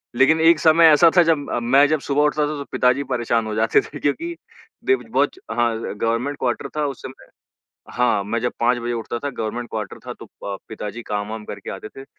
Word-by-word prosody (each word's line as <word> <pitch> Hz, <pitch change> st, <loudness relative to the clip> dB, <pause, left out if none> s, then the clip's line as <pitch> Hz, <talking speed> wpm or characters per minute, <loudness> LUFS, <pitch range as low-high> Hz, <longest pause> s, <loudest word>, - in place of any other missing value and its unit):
लेकिन 150 Hz, +6 st, +4 dB
एक 165 Hz, -1 st, +5 dB
समय 165 Hz, +1 st, +5 dB
ऐसा 155 Hz, +2 st, +7 dB
था 175 Hz, -, +8 dB
जब 160 Hz, -3 st, 0 dB
अ, -, -, 0 dB
मैं 135 Hz, +4 st, +4 dB
जब 155 Hz, 0 st, +1 dB
सुबह 140 Hz, +1 st, +2 dB
उठता 150 Hz, 0 st, +1 dB
था 150 Hz, -, -3 dB
तो 140 Hz, -, -5 dB
पिताजी 125 Hz, +3 st, +2 dB
परेशान 115 Hz, -2 st, 0 dB
हो 105 Hz, -, -4 dB
जाते 110 Hz, 0 st, +3 dB
थे 145 Hz, -, -10 dB
क्योंकि 335 Hz, -, -2 dB, 0.5 s
देव 390 Hz, 0 st, +2 dB
बहुत -, -, +2 dB, 0.2 s
हाँ, 120 Hz, -1 st, +1 dB, 0.2 s
गवर्नमेंट 115 Hz, +7 st, -1 dB
क्वार्टर 120 Hz, -2 st, -2 dB
था 150 Hz, -, +1 dB
उस 135 Hz, -, -7 dB
समय। 130 Hz, -, -10 dB, 0.7 s
हाँ, 125 Hz, -5 st, +1 dB
मैं 110 Hz, +3 st, -2 dB
जब 120 Hz, -, -1 dB
5 120 Hz, +1 st, +2 dB
बजे 120 Hz, 0 st, -3 dB
उठता 115 Hz, 0 st, -4 dB
था 145 Hz, -, 0 dB
गवर्नमेंट 120 Hz, 0 st, -4 dB
क्वार्टर 105 Hz, -3 st, -5 dB
था, -, -, -4 dB
तो -, -, -12 dB, 0.2 s
प 100 Hz, -1 st, -3 dB
पिताजी 110 Hz, +1 st, -6 dB
काम-वाम 105 Hz, +1 st, -4 dB
करके 100 Hz, -1 st, -7 dB
आते 100 Hz, +2 st, -7 dB
थे, 135 Hz, +4 st, -12 dB
125 Hz, 215 wpm, -21 LUFS, 115-145 Hz, 0.7 s, था